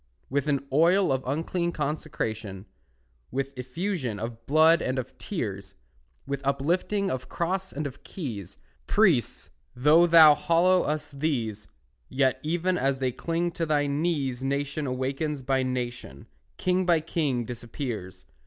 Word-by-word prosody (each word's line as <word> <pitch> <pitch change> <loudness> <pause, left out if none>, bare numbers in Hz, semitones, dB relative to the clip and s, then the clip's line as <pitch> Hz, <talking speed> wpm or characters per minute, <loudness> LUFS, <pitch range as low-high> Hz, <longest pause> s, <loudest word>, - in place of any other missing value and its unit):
With 140 +1 0
an 140 -2 0
oil 175 +5 +4
of 130 -1 +1
unclean 170 +5 -1
consecration, 115 -10 -4 0.6
With 135 0 -3
effusion 130 - -3
of 115 +1 -7
blood 160 +3 +5
and 130 +1 -1
of 130 0 -5
tears, 100 - -5 0.5
With 140 0 -3
uplifting 175 +9 0
of 130 -1 -4
cross 190 +3 -2
and 150 +1 -4
of 140 0 -7
keys, 110 - -6 0.3
Priest, 185 - +2 0.2
though 150 +7 +5
thou 160 -3 +9
hallow 175 +4 +3
us 150 0 -2
these, 125 -8 -2 0.4
Yet 130 -1 +1
even 175 +3 0
as 135 0 +1
they 130 -1 0
cling 170 +6 -2
to 165 0 -2
thy 145 -1 +2
knees 140 -4 -1
Nation 140 +2 -2
awakens 135 +3 -2
by 135 +1 +1
nation, 125 - -4 0.3
King 185 0 +1
by 175 -2 +4
king 145 -7 -1
disappears. 120 -4 -6
140 Hz, 135 wpm, -27 LUFS, 125-165 Hz, 0.6 s, thou